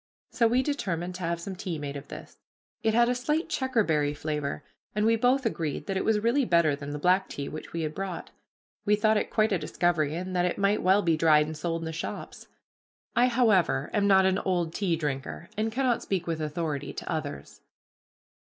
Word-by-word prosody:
So 230 Hz, -, +3 dB
we 245 Hz, +3 st, +2 dB
determined 180 Hz, -, -2 dB
to 180 Hz, -, -8 dB
have 170 Hz, 0 st, -1 dB
some 190 Hz, +3 st, -6 dB
tea 180 Hz, -3 st, -4 dB
made 145 Hz, -1 st, -5 dB
of 140 Hz, 0 st, -7 dB
this. -, -, -10 dB, 0.4 s
It 220 Hz, 0 st, +1 dB
had 235 Hz, 0 st, +5 dB
a 245 Hz, -, +2 dB
slight 300 Hz, +7 st, -1 dB
checkerberry 185 Hz, -, +1 dB
flavor, 150 Hz, -1 st, -3 dB, 0.3 s
and 210 Hz, 0 st, +1 dB
we 225 Hz, +1 st, +4 dB
both 250 Hz, +3 st, +2 dB
agreed 165 Hz, -9 st, -2 dB
that 195 Hz, -, -3 dB
it 190 Hz, -, 0 dB
was 220 Hz, -1 st, +3 dB
really 240 Hz, +6 st, +2 dB
better 170 Hz, -, +3 dB
than 140 Hz, 0 st, -7 dB
the 145 Hz, -, -4 dB
black 180 Hz, +5 st, +2 dB
tea 140 Hz, -, -5 dB
which 155 Hz, -, -8 dB
we 165 Hz, -1 st, -3 dB
had 155 Hz, -1 st, -3 dB
brought. 190 Hz, -1 st, -5 dB, 0.5 s
We 210 Hz, 0 st, +3 dB
thought 215 Hz, +1 st, +3 dB
it 210 Hz, -, 0 dB
quite 215 Hz, 0 st, +2 dB
a 190 Hz, -, +2 dB
discovery, 160 Hz, -4 st, 0 dB
and 185 Hz, +2 st, -4 dB
that 180 Hz, 0 st, +2 dB
it 180 Hz, -, -1 dB
might 200 Hz, +1 st, +2 dB
well 195 Hz, +2 st, +4 dB
be 165 Hz, -2 st, +3 dB
dried 155 Hz, -1 st, +5 dB
and 155 Hz, +1 st, -6 dB
sold 165 Hz, +1 st, -2 dB
in -, -, -4 dB
the 160 Hz, -, -4 dB
shops. 160 Hz, -, -6 dB, 0.7 s
I 245 Hz, +2 st, +4 dB
for 250 Hz, +1 st, 0 dB
one, -, -, +5 dB
however, 170 Hz, -7 st, +2 dB
am 205 Hz, -1 st, +2 dB
not 190 Hz, -1 st, +6 dB
an 190 Hz, 0 st, +2 dB
old 175 Hz, -3 st, -1 dB
tea 185 Hz, -4 st, 0 dB
drinker 150 Hz, +2 st, -4 dB
and 220 Hz, +1 st, -1 dB
cannot 250 Hz, -1 st, +1 dB
speak 185 Hz, -3 st, -2 dB
with 165 Hz, -2 st, -2 dB
authority 150 Hz, -2 st, -3 dB
to -, -, -7 dB
others. 145 Hz, -, -5 dB
180 Hz, 220 wpm, -28 LUFS, 155-215 Hz, 0.7 s, not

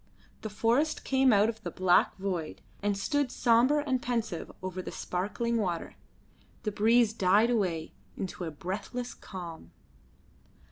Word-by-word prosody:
The 215 Hz, -, -4 dB
forest 240 Hz, +9 st, +1 dB
came 265 Hz, -1 st, +3 dB
out 205 Hz, 0 st, +5 dB
of 225 Hz, -1 st, -4 dB
the -, -, -4 dB
black 185 Hz, -2 st, +3 dB
void 175 Hz, -, -3 dB, 0.2 s
and 205 Hz, -1 st, 0 dB
stood 285 Hz, +5 st, 0 dB
sombre 250 Hz, +5 st, +3 dB
and 260 Hz, -3 st, 0 dB
pensive 230 Hz, -8 st, -2 dB
over 185 Hz, 0 st, -4 dB
the -, -, -7 dB
sparkling 210 Hz, +6 st, -2 dB
water. 180 Hz, -6 st, -2 dB, 0.7 s
The 210 Hz, -, -1 dB
breeze 225 Hz, +2 st, +4 dB
died 210 Hz, +3 st, +4 dB
away 180 Hz, -8 st, -1 dB, 0.2 s
into 185 Hz, -1 st, -4 dB
a -, -, -3 dB
breathless 200 Hz, +10 st, -5 dB
calm. 170 Hz, -, -9 dB
210 Hz, 140 wpm, -29 LUFS, 185-240 Hz, 0.7 s, out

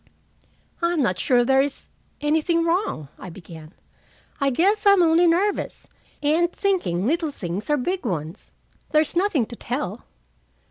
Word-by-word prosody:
"I'm 340 Hz, -3 st, +1 dB
not 185 Hz, -7 st, 0 dB
sure 245 Hz, -3 st, +3 dB
there 265 Hz, +1 st, +4 dB
is 280 Hz, 0 st, -4 dB, 0.4 s
anything 320 Hz, +3 st, +1 dB
wrong," 335 Hz, -, -1 dB
I -, -, -8 dB
began. 165 Hz, -2 st, -12 dB, 0.6 s
"I 280 Hz, -, +2 dB
guess 395 Hz, -, +2 dB
I'm 400 Hz, -3 st, +6 dB
only 335 Hz, +1 st, +4 dB
nervous, 375 Hz, +5 st, 0 dB, 0.4 s
and 330 Hz, +4 st, +2 dB
thinking 345 Hz, -, -1 dB
little 320 Hz, +4 st, 0 dB
things 190 Hz, -, -5 dB
are 295 Hz, -, +3 dB
big 360 Hz, +8 st, -2 dB
ones. 160 Hz, +1 st, -5 dB, 0.4 s
There's 305 Hz, +1 st, +1 dB
nothing 345 Hz, -, +1 dB
to 235 Hz, -, -10 dB
tell." 235 Hz, -4 st, -5 dB
295 Hz, 140 wpm, -23 LUFS, 215-345 Hz, 0.6 s, I'm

